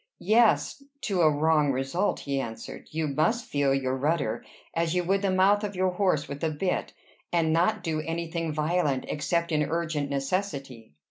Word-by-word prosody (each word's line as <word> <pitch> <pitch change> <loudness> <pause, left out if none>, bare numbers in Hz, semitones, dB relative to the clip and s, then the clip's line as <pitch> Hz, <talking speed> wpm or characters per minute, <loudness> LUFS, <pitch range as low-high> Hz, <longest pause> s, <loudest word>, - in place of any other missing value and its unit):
"Yes 230 +4 +3 0.2
to 190 -5 0
a 155 - +6
wrong 150 -1 +3
result," 135 +10 -1
he 140 -1 -2
answered. 115 -4 -7
"You 160 0 -2
must 220 - +1
feel 145 - +1
your 130 -1 0
rudder, 135 -5 0 0.3
as 165 +1 0
you 180 - +2
would 195 +3 +1
the 200 - +1
mouth 195 +3 +4
of 205 -1 -3
your 185 0 +1
horse 180 -5 +1
with 140 0 -6
the 160 - 0
bit, 170 +5 -2 0.4
and 165 -2 +2
not 180 +4 +2
do 160 -3 -1
any 165 +2 -3
thing 165 -2 -2
violent, 150 -3 0
except 170 +3 -1
in 155 -1 +2
urgent 155 -2 -1
necessity." 135 - -3
160 Hz, 180 wpm, -27 LUFS, 140-180 Hz, 0.4 s, a